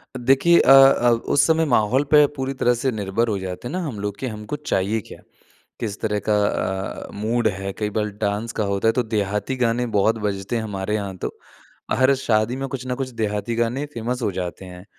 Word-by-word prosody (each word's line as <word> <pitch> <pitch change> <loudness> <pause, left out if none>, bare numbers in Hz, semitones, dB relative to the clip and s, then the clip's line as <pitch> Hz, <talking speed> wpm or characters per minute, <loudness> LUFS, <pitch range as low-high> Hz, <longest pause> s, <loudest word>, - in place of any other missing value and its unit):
अ, - - -4
देखिए 135 +8 +4
अ - - +5
अ, 135 -3 +7
उस 120 +4 +2
समय 160 0 +3
माहौल 130 0 +2
पे 150 -1 +7
पूरी 135 0 -3
तरह 125 -2 +2
से 135 - +1
निर्भर 110 +1 -1
हो 105 -3 -1
जाते 95 +4 -6
हैं - - -6
ना 185 - -1
हम 125 -9 -5
लोग 100 0 -4
कि 130 - -3
हमको 105 +2 -5
चाहिए 110 -7 -1
क्या? - - -13 0.6
किस 105 -3 -4
तरह 105 -1 0
का - - +4
अ, 95 0 -3
मूड 110 +3 0
है, 95 -1 -3
कई 105 -1 -1
बाल 105 -1 -1
डांस 105 +2 -1
का - - +2
होता 100 +3 0
है - - +6
तो 125 - +1
देहाती 105 +2 -2
गाने 120 +1 +1
बहुत 110 +3 +3
बजते 100 +2 -3
हैं 115 - -1
हमारे 105 -1 -3
यहाँ 100 -2 -4
तो, - - -4 0.6
हर 130 +3 +4
शादी 115 -2 0
में 135 +1 -3
कुछ 130 0 -5
न 125 - -1
कुछ 130 0 -4
देहाती 105 +2 -1
गाने 120 +5 -1
फेमस 120 +2 -3
हो 110 - 0
जाते 90 0 -5
हैं। 90 0 -11
110 Hz, 220 wpm, -22 LUFS, 100-130 Hz, 0.6 s, अ